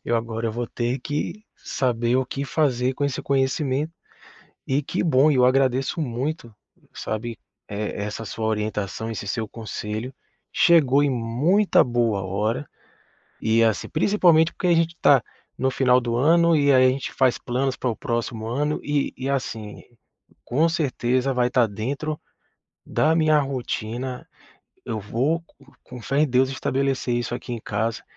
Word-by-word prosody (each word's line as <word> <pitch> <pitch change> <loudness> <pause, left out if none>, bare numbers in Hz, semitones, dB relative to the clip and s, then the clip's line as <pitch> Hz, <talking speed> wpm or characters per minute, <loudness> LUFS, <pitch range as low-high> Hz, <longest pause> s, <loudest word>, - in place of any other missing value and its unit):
eu 120 - 0
agora 115 0 -2
vou 120 +2 -3
ter 120 +3 -2
que 150 +10 -4
saber 120 -2 0
o 130 0 0
que 140 +2 -4
fazer 130 -4 +1
com 145 - -2
esse 140 -3 -2
conhecimento 140 +2 0 0.7
e 140 +2 +1
que - - -2
bom, 150 -2 +4
eu 130 -3 +4
agradeço 130 +4 +2
muito, 130 -1 -3 0.4
sabe, 110 +1 -5 0.3
e - - -5 0.2
essa 105 +2 -4
sua 110 +2 -4
orientação, 105 0 -2
esse 100 -2 -5
seu 110 +1 -2
conselho, 110 +2 -5 0.4
chegou 145 -5 +5
em 145 - +2
muita 130 - +2
boa 120 -5 0
hora. 105 +8 -2 0.7
E, 115 +1 +3
assim, 110 -3 0
principalmente 170 -2 +3
porque 185 - -3
a 175 - +5
gente 165 0 +1
tá 135 -5 +5 0.4
no 130 +1 +1
final 125 -1 +3
do 120 -1 -2
ano 170 +5 +4
e 140 -1 +4
aí 130 0 +6
a - - +6
gente 135 +1 -4
faz 130 -2 +2
planos 130 +1 -1
pra 125 - -1
o 110 - -4
próximo 115 -3 -3
ano 145 +6 -1
e 145 -1 -1
e, 130 +1 -4
assim, 115 -6 -4 0.6
com 155 +7 +2
certeza, 135 -5 0
vai 125 0 +2
tá 125 -2 +3
dentro 135 +9 -4 0.7
da 160 +1 +2
minha 155 -2 +4
rotina, 125 -2 -4 0.6
eu 110 -2 -3
vou 135 +11 -1 0.4
com 125 -1 -10
fé 135 +5 0
em 155 - +3
Deus 130 +1 +2
estabelecer 135 -1 -1
isso 120 0 -2
aqui 125 0 -6
em 115 - -4
casa. 110 +2 -2
130 Hz, 160 wpm, -23 LUFS, 115-145 Hz, 0.7 s, aí